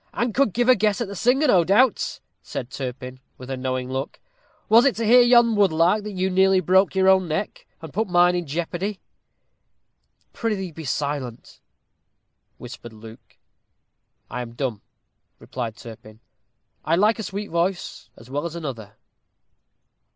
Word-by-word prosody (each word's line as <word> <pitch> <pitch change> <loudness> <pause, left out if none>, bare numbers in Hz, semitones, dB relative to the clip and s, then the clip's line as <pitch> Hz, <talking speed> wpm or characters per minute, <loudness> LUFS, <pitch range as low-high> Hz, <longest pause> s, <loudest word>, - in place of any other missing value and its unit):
"And 240 -2 -1
could 275 -3 +2
give 240 +5 0
a 255 - +8
guess 210 -1 +1
at 235 - -2
the 200 - -8
singer, 255 - +2
no 190 - +4
doubt," 215 +7 +2 0.2
said 125 - -7
Turpin, 130 -1 -6 0.2
with 130 +1 -9
a - - -2
knowing 130 -1 -3
look. 135 +2 -4 0.5
"Was 230 +2 +6
it 275 -2 +2
to 230 - -2
hear 245 +3 +7
yon 240 -2 +5
woodlark 185 0 +3
that 210 0 -6
you 190 0 -1
nearly 190 0 +4
broke 190 +3 +2
your 190 0 +3
own 190 -1 +4
neck, 160 +6 -4 0.2
and 160 - -9
put 220 +2 -1
mine 180 0 +4
in 175 -2 -3
jeopardy?" 175 +6 -4 1.3
"Prithee 200 -6 -3
be 160 0 -9
silent," 140 -4 -4 1.0
whispered 120 - -10
Luke. 110 +1 -14 0.9
"I - - -5
am 115 -1 -8
dumb," 120 -4 -4 0.6
replied 115 -4 -6
Turpin; 110 -2 -13 0.6
"I 165 - +1
like 210 +5 +2
a - - -3
sweet 205 0 -6
voice 175 +2 -2
as 115 - -15
well 145 +4 -3
as 170 - -9
another." 120 -11 -7
175 Hz, 160 wpm, -23 LUFS, 130-210 Hz, 1.3 s, a